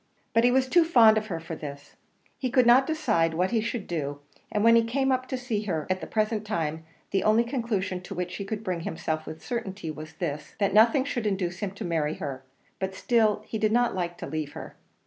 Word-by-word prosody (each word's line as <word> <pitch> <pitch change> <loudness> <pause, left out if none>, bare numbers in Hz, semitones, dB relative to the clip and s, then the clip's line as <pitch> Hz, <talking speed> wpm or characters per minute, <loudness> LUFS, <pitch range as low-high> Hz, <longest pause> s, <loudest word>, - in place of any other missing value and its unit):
But 230 0 +4
he 245 - +6
was 260 +1 +3
too 345 +5 +5
fond 230 -9 +6
of 215 - -9
her 170 -6 -3
for 165 0 -6
this; 140 -2 -9 0.4
he 255 - -1
could 250 0 +4
not 250 +3 +6
decide 170 - +1
what 180 +3 +1
he 225 -2 +1
would 230 -5 -4
do; 145 -4 -3 0.3
and 210 - 0
when 230 0 +7
he 230 - +5
came 265 +4 0
up 255 0 0
to 260 - -3
see 245 -4 -2
her 160 -6 -2
at 185 - -1
the - - -6
present 215 0 0
time, 160 -6 -2 0.3
the 195 -1 +1
only 215 +2 +4
conclusion 225 -7 -2
to 180 - -8
which 180 0 -4
he 200 - -4
could 210 +2 -4
bring 185 -4 -2
himself 160 -1 -3
with 160 - -8
certainty 200 -8 -4
was 155 +1 -9
this 150 -5 -5
that 200 -2 +1
nothing 230 +5 +5
should 240 -6 -2
induce 185 -3 -2
him 205 - -2
to 195 - -6
marry 160 -3 0
her; 135 -2 -5 0.4
but 190 0 -3
still 215 -1 +2
he 220 - -4
did 215 0 +2
not 240 +1 +3
like 175 -2 -3
to - - -6
leave 155 -2 -4
her. - - -9
205 Hz, 235 wpm, -27 LUFS, 170-235 Hz, 0.4 s, when